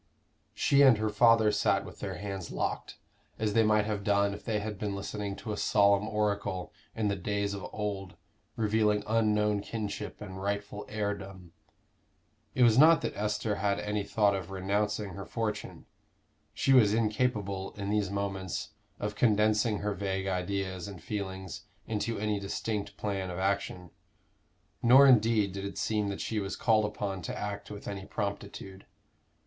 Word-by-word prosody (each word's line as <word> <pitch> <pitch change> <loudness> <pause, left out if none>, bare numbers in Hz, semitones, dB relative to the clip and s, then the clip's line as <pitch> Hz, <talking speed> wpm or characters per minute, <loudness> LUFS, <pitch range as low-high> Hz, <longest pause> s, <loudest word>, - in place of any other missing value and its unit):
She 140 0 +4
and 130 -5 +7
her 110 0 0
father 110 0 +5
sat - - +1
with - - -11
their - - -4
hands 95 -3 -5
locked, - - -3 0.4
as 110 -2 -1
they 115 - +5
might 105 -1 +3
have 105 -2 -2
done 100 0 +2
if 105 - -9
they 110 -3 -1
had 105 -1 -5
been 100 -2 -2
listening 100 0 -4
to 110 - -6
a 105 - -3
solemn 100 -1 +3
oracle 105 -4 -1 0.2
in 110 -2 0
the 100 - +1
days 100 +1 -2
of 100 -2 -5
old 100 -3 -4 0.4
revealing 105 -1 +2
unknown 105 -2 +2
kinship 105 -1 -5
and 95 -2 -8
rightful 100 +1 -3
heirdom. 100 -4 -4 1.0
It 125 - +4
was 115 0 +6
not 160 +1 +7
that - - -3
Esther 105 0 -1
had 100 0 +1
any 105 0 -2
thought 100 0 +2
of 95 -2 -5
renouncing 100 +2 -1
her 100 +2 -7
fortune; 110 -2 -4 0.7
she 135 - +2
was 110 -5 +6
incapable, 105 -4 -1
in 100 0 -4
these 105 -3 +1
moments, 95 -2 -3 0.3
of 105 0 -2
condensing 105 0 +2
her 105 0 -1
vague 95 -1 -2
ideas 95 -1 -2
and 100 -3 -8
feelings 95 -1 -5 0.2
into 110 +1 -2
any 105 0 -1
distinct 100 +1 -3
plan 100 -3 -2
of 90 - -5
action, 95 -2 -2 0.9
nor 130 +4 +8
indeed 110 -5 +4
did 100 +1 -5
it 100 0 -5
seem 105 -2 0
that 100 -1 -4
she 110 - -2
was 100 -1 -3
called 110 -3 +3
upon 100 -2 -3
to - - -5
act 105 -1 -5
with 105 0 -8
any 95 -1 -5
promptitude. 100 -2 -5
105 Hz, 165 wpm, -30 LUFS, 100-105 Hz, 1.0 s, nor